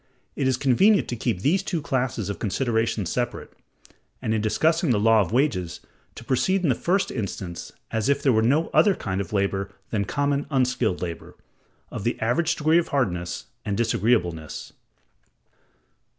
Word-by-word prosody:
It 135 - 0
is 130 -2 +2
convenient 190 - +4
to 120 - -2
keep 115 -5 -2
these 175 - +2
two 185 -3 -2
classes 130 -7 -2
of 100 -4 -4
considerations 115 -3 -1
separate; 120 -1 -3 0.7
and 110 - -1
in 110 - 0
discussing 160 - +1
the 115 -4 +3
law 110 0 +5
of 95 - -2
wages, 105 - 0 0.4
to - - -9
proceed 185 +10 +1
in 160 - +2
the - - +4
first 185 - 0
instance 95 -6 -5 0.2
as 110 +3 0
if 140 0 +1
there 135 - +4
were 110 - +3
no 145 +8 +2
other 205 -3 +4
kind 95 -1 -3
of 95 - -7
labor 100 -1 0 0.2
than 100 -3 0
common 140 +5 -1
unskilled 125 -9 0
labor, 85 -3 -6 0.6
of - - -5
the 120 - -1
average 155 +9 +1
degree 155 +2 +3
of 170 - -2
hardness 90 -10 -2 0.2
and 100 -1 -2
disagreeableness. 105 -8 0
120 Hz, 165 wpm, -24 LUFS, 100-140 Hz, 0.7 s, law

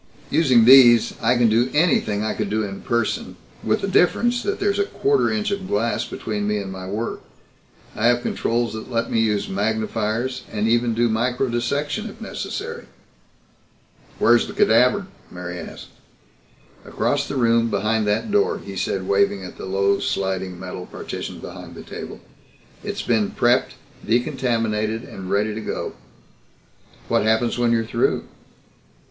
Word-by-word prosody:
Using 130 -8 +4
these 120 -3 +7
I 125 - +3
can 120 -1 +4
do 115 +3 +2
anything 135 -10 +2
I 110 - -1
could 105 -2 -3
in 105 -2 -2
person 120 -2 -1 0.3
with - - +1
the 195 - -1
difference 240 +6 +2
that 405 - -2
there's 400 0 +1
a 405 - +2
quarter 415 +1 +1
inch 215 -1 -1
of 200 -1 -3
glass 115 +3 0
between 105 -2 -4
me 105 0 0
and 100 -2 -5
my 95 -1 -7
work. 105 +4 -4 0.7
I 110 - +2
have 120 0 +2
controls 115 -1 -1
that 110 +3 -7
let 115 -2 -1
me 115 - +2
use 105 -2 +1
magnifiers, 110 +4 -1
and 110 0 -1
even 120 0 +2
do 120 +1 +3
microdissection, 125 +5 -1
if - - -13
necessary." - - -6 1.3
"Where's 120 +1 +4
the - - -7
cadaver?" 125 - +3 0.2
Mary 90 0 -7
asked. 80 - -9 0.9
"Across - - -1
the - - -4
room, 115 -2 +3
behind 110 +1 0
that 105 - 0
door," 205 0 +2
he 100 -1 -9
said, 95 0 -2
waving 100 0 +2
at 90 - -11
the - - -6
low, 100 +1 +1
sliding 95 -2 -2
metal 90 -1 -7
partition - - -6
behind - - -9
the - - -9
table. - - -8 0.6
"It's - - -4
been 110 -4 +1
prepped, 120 +1 +2 0.3
decontaminated 115 -3 0
and 95 -6 -8
ready 105 +2 +1
to 110 - -5
go." - - -4 1.1
"What - - +2
happens 110 +3 +1
when 120 -1 +2
you're 115 -1 +1
through?" - - 0
115 Hz, 155 wpm, -22 LUFS, 105-125 Hz, 1.3 s, these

